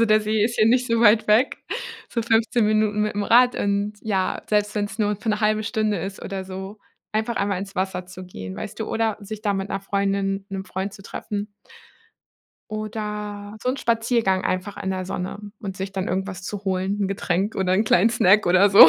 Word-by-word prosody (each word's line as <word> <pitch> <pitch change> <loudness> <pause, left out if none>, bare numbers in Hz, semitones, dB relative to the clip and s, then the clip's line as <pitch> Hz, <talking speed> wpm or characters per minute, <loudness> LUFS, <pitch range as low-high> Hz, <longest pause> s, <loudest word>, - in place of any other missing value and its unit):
Also, - - +6
der 215 -1 +4
See 215 0 +1
ist 235 +1 -1
ja 215 - +6
nicht 250 +2 +4
so 230 -1 +1
weit 220 -1 +6
weg, 215 +5 +4 0.5
so 230 - -1
15 225 0 +2
Minuten 215 0 +2
mit 210 0 -1
dem 205 0 -1
Rad. 245 +3 +5
Und 200 +1 0
ja, 195 -4 0
selbst 210 0 +1
wenn's 205 0 -2
nur 210 -1 +1
für 210 - -6
'ne 210 -1 +1
halbe 215 0 +2
Stunde 215 -2 0
ist 190 +3 -5
oder 195 -1 -4
so, 190 +2 -7 0.3
einfach 220 +2 0
einmal 200 -2 0
ins 195 +1 -7
Wasser 185 -1 -2
zu 185 0 -9
gehen, 95 - -8
weißt - - -6
du, 220 - -1
oder 225 -2 0
sich 210 +1 -7
da 205 -2 +1
mit 195 0 -2
'ner - - -2
Freundin, 195 0 0
'nem 195 -1 -4
Freund 190 +1 -4
zu 195 - -12
treffen. 205 +1 -5 1.2
Oder 210 -1 -5
so - - -1
'n 255 - +1
Spaziergang 225 -6 +1
einfach 185 +2 -2
in 190 - -1
der 185 -1 -2
Sonne 180 +1 -4 0.2
und 195 -2 -5
sich 190 +1 -4
dann 190 -1 -2
irgendwas 190 0 -3
zu 200 +2 -5
holen, 190 +1 0
'n 200 - +2
Getränk 195 +1 -1
oder 185 -1 +1
'n 210 - +3
kleinen 215 +1 +4
Snack 205 -2 +5
oder 185 +3 +5
so. 195 -4 +11
205 Hz, 215 wpm, -23 LUFS, 190-215 Hz, 1.2 s, so